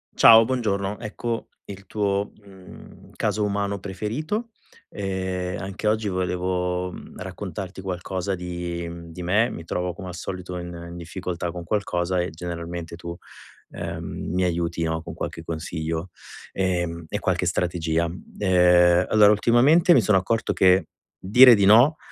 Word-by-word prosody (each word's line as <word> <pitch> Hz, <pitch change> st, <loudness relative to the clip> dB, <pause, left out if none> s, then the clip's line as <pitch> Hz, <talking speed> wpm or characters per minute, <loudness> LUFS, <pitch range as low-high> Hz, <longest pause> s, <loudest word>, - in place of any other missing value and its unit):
Ciao, 115 Hz, 0 st, +8 dB
buongiorno. 105 Hz, -5 st, -1 dB
Ecco 115 Hz, +2 st, -4 dB, 0.2 s
il 100 Hz, -1 st, -10 dB
tuo, 100 Hz, 0 st, -1 dB
mhmm, 95 Hz, -2 st, -15 dB
caso 105 Hz, -, 0 dB
umano 100 Hz, 0 st, -1 dB
preferito. 120 Hz, -, -4 dB, 0.4 s
Ehm, 95 Hz, -2 st, -3 dB
anche 95 Hz, +3 st, -4 dB
oggi 110 Hz, 0 st, +1 dB
volevo 90 Hz, 0 st, -1 dB, 0.3 s
raccontarti 95 Hz, 0 st, -6 dB
qualcosa 95 Hz, +1 st, -3 dB
di 85 Hz, -1 st, -5 dB
di 90 Hz, -, -8 dB
me. 105 Hz, +7 st, +2 dB
Mi 85 Hz, -, -7 dB
trovo 90 Hz, +2 st, -3 dB
come 95 Hz, +1 st, -9 dB
al 90 Hz, -, -7 dB
solito 90 Hz, +1 st, -6 dB
in 85 Hz, 0 st, -6 dB, 0.2 s
in 85 Hz, -, -8 dB
difficoltà 85 Hz, 0 st, -5 dB
con 90 Hz, 0 st, -7 dB
qualcosa 90 Hz, -2 st, -1 dB
e 90 Hz, -1 st, -1 dB
generalmente 85 Hz, 0 st, -6 dB
tu, 85 Hz, 0 st, -7 dB, 0.6 s
ehm, 85 Hz, -1 st, -5 dB, 0.3 s
mi 90 Hz, +1 st, +1 dB
aiuti 85 Hz, -1 st, -1 dB
no, 80 Hz, 0 st, -2 dB
con -, -, -7 dB
qualche 80 Hz, -, -5 dB
consiglio, 80 Hz, +1 st, -4 dB, 0.4 s
ehm, 85 Hz, -3 st, -1 dB
e -, -, -2 dB
qualche -, -, 0 dB
strategia. 85 Hz, -1 st, 0 dB, 0.3 s
Ehm, 90 Hz, -2 st, +5 dB
allora 105 Hz, -1 st, +6 dB
ultimamente 130 Hz, -, +5 dB
mi 130 Hz, -, +5 dB
sono 105 Hz, -1 st, +3 dB
accorto 115 Hz, +5 st, 0 dB
che 95 Hz, 0 st, +4 dB, 0.3 s
dire 125 Hz, +6 st, +8 dB
di 100 Hz, -3 st, +3 dB
no 120 Hz, +10 st, +6 dB
90 Hz, 140 wpm, -24 LUFS, 85-100 Hz, 0.6 s, Ciao